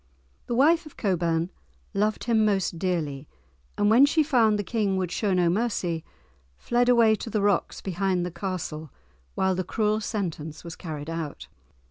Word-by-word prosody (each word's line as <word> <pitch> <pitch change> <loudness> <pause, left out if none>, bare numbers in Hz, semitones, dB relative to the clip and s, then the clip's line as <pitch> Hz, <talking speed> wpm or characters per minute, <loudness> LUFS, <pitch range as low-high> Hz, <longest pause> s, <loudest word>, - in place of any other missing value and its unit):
The 240 - -1
wife 320 +5 +4
of 305 - -16
Cockburne 170 -3 0 0.4
loved 210 +2 0
him 225 -2 +2
most 195 -5 0
dearly, 155 -6 -2 0.5
and 205 - +2
when 260 +5 +7
she 310 +2 +3
found 230 -7 +3
the 205 - -2
King 205 -2 0
would 185 -2 -2
show 205 +2 0
no 180 -2 +3
mercy, 175 -4 -1 0.5
fled 245 - +1
away 230 -3 +5
to 220 +2 -4
the 215 - 0
rocks 200 -2 0
behind 185 -1 -1
the 180 - -4
castle 160 -5 -5 0.4
whilst 190 -1 +1
the 185 - 0
cruel 215 +3 0
sentence 165 -8 -4
was 170 -1 -7
carried 155 -4 -7
out. 165 -3 -5
195 Hz, 165 wpm, -26 LUFS, 170-220 Hz, 0.5 s, when